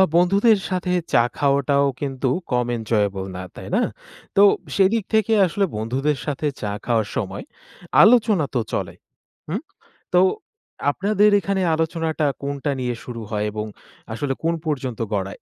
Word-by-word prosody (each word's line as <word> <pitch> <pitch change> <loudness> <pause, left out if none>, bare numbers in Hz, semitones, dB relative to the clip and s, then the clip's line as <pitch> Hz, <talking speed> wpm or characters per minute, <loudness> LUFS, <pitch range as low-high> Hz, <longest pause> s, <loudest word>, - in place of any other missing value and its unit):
বন্ধুদের 200 +5 +4
সাথে 180 -1 -1 0.2
চা 120 - +6
খাওয়াটাও 140 0 +2 0.2
কিন্তু 135 -2 -1 0.2
কম 125 -1 +2
এনজয়েবল 105 -4 0
না, 90 - -5
তাই - - -9
না? - - +3 0.5
তো 200 - +6 0.3
সেদিক 200 +2 +3
থেকে 220 0 +3
আসলে 195 +3 0
বন্ধুদের 135 +6 -1
সাথে 145 +1 -1
চা 105 -1 -2
খাওয়ার 115 -3 +1
সময় 100 -4 -3 0.6
আলোচনা 215 -8 +5
তো - - +3
চলে, - - -2 0.6
হুম? - - -2 0.5
তো - - +7 0.7
আপনাদের 210 +5 +3
এখানে 195 0 -1
আলোচনাটা 160 -1 -1 0.2
কোনটা 140 +1 -2
নিয়ে 125 -1 -1
শুরু 120 -2 -7
হয় 105 -1 -1
এবং 105 0 -4 0.5
আসলে 135 +3 -2
কোন 165 +1 +2
পর্যন্ত 130 -6 -3
গড়ায়? 95 -1 -1
140 Hz, 140 wpm, -22 LUFS, 120-185 Hz, 0.7 s, তো